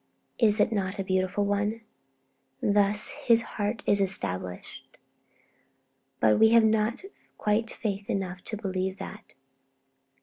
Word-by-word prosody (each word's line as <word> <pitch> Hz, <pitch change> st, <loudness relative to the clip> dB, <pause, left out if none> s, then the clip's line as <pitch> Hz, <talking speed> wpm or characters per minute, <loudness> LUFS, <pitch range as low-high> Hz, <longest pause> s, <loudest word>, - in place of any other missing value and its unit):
Is 215 Hz, -2 st, +4 dB
it 210 Hz, -, +3 dB
not 195 Hz, -2 st, -2 dB
a 195 Hz, -, -2 dB
beautiful 185 Hz, +2 st, 0 dB
one? 205 Hz, +3 st, -1 dB, 0.8 s
Thus 205 Hz, 0 st, +3 dB
'his 230 Hz, -1 st, +2 dB
heart 210 Hz, +1 st, -4 dB
is 200 Hz, 0 st, +2 dB
established.' 95 Hz, -, -3 dB, 1.2 s
But 110 Hz, -1 st, +3 dB
we 220 Hz, -, +6 dB
have 230 Hz, -1 st, +6 dB
not 220 Hz, +6 st, 0 dB, 0.3 s
quite 215 Hz, +2 st, 0 dB
faith 200 Hz, -2 st, -5 dB
enough 185 Hz, -2 st, -3 dB
to 215 Hz, -, -4 dB
believe 190 Hz, -1 st, -3 dB
that. 210 Hz, +2 st, -10 dB
205 Hz, 125 wpm, -27 LUFS, 190-215 Hz, 1.2 s, we